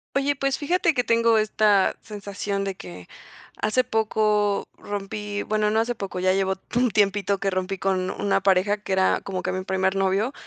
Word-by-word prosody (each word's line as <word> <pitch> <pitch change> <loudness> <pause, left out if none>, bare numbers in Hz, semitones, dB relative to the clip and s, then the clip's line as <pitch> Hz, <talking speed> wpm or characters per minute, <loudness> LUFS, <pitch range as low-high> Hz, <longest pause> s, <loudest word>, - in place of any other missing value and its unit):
Oye, 280 +1 +1
pues, 275 0 -1
fíjate 335 +2 +1
que 245 - +2
tengo 230 0 +3
esta 215 -2 +3
sensación 200 -1 -4
de 195 - -2
que 90 - -11 0.5
hace 215 +4 +2
poco 215 -3 +1
rompí, 205 0 -5
bueno, 215 0 0
no 220 +1 +2
hace 235 +2 0
poco, 195 -4 -5
ya 185 +1 +2
llevo 190 0 +1 0.2
un 245 0 +3
tiempito 200 -1 +1
que 195 0 0
rompí 185 +1 -2
con 185 -1 0
una 195 0 0
pareja 195 +1 +3
que 205 -2 -4
era 190 0 +2
como 185 -2 -5
que - - -1
mi 185 0 -3
primer 190 0 0
novio. 195 +6 +1
205 Hz, 185 wpm, -24 LUFS, 190-220 Hz, 0.5 s, tengo